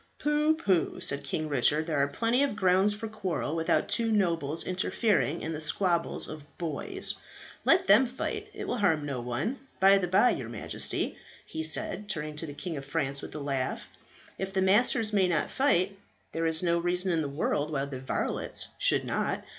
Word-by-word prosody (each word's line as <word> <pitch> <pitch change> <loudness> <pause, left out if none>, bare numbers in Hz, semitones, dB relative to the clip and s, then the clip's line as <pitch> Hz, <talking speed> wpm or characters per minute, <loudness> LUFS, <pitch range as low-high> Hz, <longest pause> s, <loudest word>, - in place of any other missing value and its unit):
"Pooh, 300 +1 +2
pooh," 190 - 0
said 140 -6 0
King 155 +3 -2
Richard, 150 +2 +2
"there 155 -3 -1
are 140 - +3
plenty 230 - +1
of 280 -6 +1
grounds 190 +1 +3
for 225 +2 -5
quarrel 190 -8 -3
without 165 +1 +1
two 225 +3 +1
nobles 165 -7 0
interfering 185 -2 0
in 160 - -3
the 155 - -4
squabbles 170 +2 0
of 150 -2 -11
boys. 175 - 0 0.5
Let 375 +1 +4
them 265 -8 +6
fight; 415 - -4
it - - -7
will 245 - -2
harm 160 -7 +2
no 135 -4 -3
one. 125 - -3 0.2
By 195 +1 +6
the 180 - -1
bye, 195 +7 +4
your 120 -4 -4
Majesty," 115 -3 -3 0.3
he 160 - -5
said, 200 +6 -2
turning 150 -4 -4
to 165 - -5
the 145 - -8
King 165 0 -4
of 135 - -7
France 140 -2 -1
with - - -9
a - - -4
laugh, 135 -2 -3 0.5
"if 195 0 -3
the 195 - -1
masters 215 +2 +3
may 195 -3 +4
not 170 -3 0
fight, 200 -8 +2 0.4
there 165 0 -1
is 160 +1 +1
no 170 -1 +2
reason 180 +2 0
in 165 -2 +1
the 145 - -3
world 145 +1 -1
why 140 -3 -1
the 135 -2 -6
varlets 130 - -1
should - - +3
not. - - -2
170 Hz, 195 wpm, -29 LUFS, 150-205 Hz, 0.5 s, them